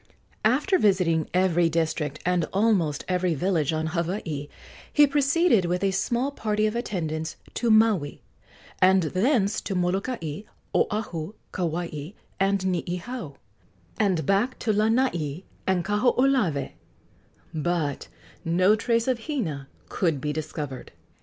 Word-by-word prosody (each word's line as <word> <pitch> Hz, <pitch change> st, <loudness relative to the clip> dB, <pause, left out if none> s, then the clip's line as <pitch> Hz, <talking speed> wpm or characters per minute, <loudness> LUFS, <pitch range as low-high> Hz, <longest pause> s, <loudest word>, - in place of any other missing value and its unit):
After 295 Hz, -, +3 dB
visiting 180 Hz, -6 st, +2 dB
every 175 Hz, -2 st, +3 dB
district 155 Hz, -3 st, -1 dB
and 180 Hz, -2 st, +2 dB
almost 190 Hz, -7 st, +1 dB
every 180 Hz, -2 st, +1 dB
village 165 Hz, -2 st, +1 dB
on 160 Hz, 0 st, -1 dB
Hawaii, 170 Hz, -4 st, -2 dB, 0.4 s
he 295 Hz, -, +6 dB
proceeded 285 Hz, -, +3 dB
with 180 Hz, +2 st, -1 dB
a 195 Hz, -, +2 dB
small 240 Hz, +8 st, 0 dB
party 215 Hz, -5 st, 0 dB
of 215 Hz, +1 st, -1 dB
attendants 160 Hz, -9 st, -3 dB, 0.2 s
to 235 Hz, -, 0 dB
Maui, 215 Hz, -9 st, +3 dB, 0.6 s
and 185 Hz, 0 st, +5 dB
thence 200 Hz, -, +1 dB
to 195 Hz, -, -4 dB
Molokai, 180 Hz, -, -2 dB, 0.3 s
Oahu, 205 Hz, -3 st, -1 dB, 0.2 s
Kauai 170 Hz, -2 st, -3 dB, 0.3 s
and 195 Hz, 0 st, +2 dB
Niihau, 180 Hz, -, -3 dB, 0.6 s
and 190 Hz, -7 st, +1 dB
back 200 Hz, +7 st, +1 dB
to 220 Hz, -, 0 dB
Lanai 205 Hz, -, +1 dB, 0.2 s
and 185 Hz, -2 st, +1 dB
Kahoolawe; 215 Hz, -, +2 dB, 0.8 s
but 160 Hz, -3 st, -1 dB, 0.4 s
no 185 Hz, +5 st, +4 dB
trace 230 Hz, +2 st, 0 dB
of 250 Hz, -1 st, -1 dB
Hina 160 Hz, -, -3 dB, 0.2 s
could 165 Hz, -6 st, 0 dB
be 150 Hz, +2 st, -2 dB
discovered. 150 Hz, -3 st, -5 dB
185 Hz, 120 wpm, -25 LUFS, 160-220 Hz, 0.8 s, he